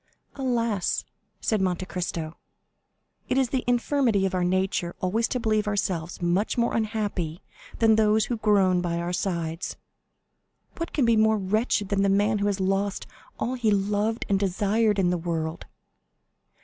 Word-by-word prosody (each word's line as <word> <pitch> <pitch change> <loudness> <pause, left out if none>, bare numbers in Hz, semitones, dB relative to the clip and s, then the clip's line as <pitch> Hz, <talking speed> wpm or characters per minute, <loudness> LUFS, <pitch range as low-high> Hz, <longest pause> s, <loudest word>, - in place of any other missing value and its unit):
"Alas," 235 -7 -1 0.4
said 215 -3 +1
Monte 185 -1 0
Cristo, 170 -3 -4 0.9
"it - - +1
is 265 -2 +2
the 260 0 -1
infirmity 245 -4 +2
of 190 - -1
our 180 -1 +1
nature 185 -1 0
always 215 +5 +1
to 250 - -2
believe 215 -2 +1
ourselves 180 -5 -2
much 180 +7 +1
more 235 0 +1
unhappy 205 -7 -2 0.3
than 220 -1 +4
those 215 0 +3
who 240 - -2
groan 195 -4 +3
by 170 -1 -1
our 170 +1 -2
sides!" 170 -3 -2 1.0
"What 335 - -4
can 275 - +1
be 230 -1 +4
more 220 0 +4
wretched 205 +1 0
than 200 -1 +1
the 200 - +3
man 205 +2 +2
who 200 - +1
has 200 -1 -1
lost 195 +1 0 0.3
all 245 - -2
he 240 -4 0
loved 210 +3 0
and 195 -1 +2
desired 205 +2 +1
in 180 -2 +2
the 180 - 0
world?" 165 -1 -3
200 Hz, 160 wpm, -26 LUFS, 180-220 Hz, 1.0 s, than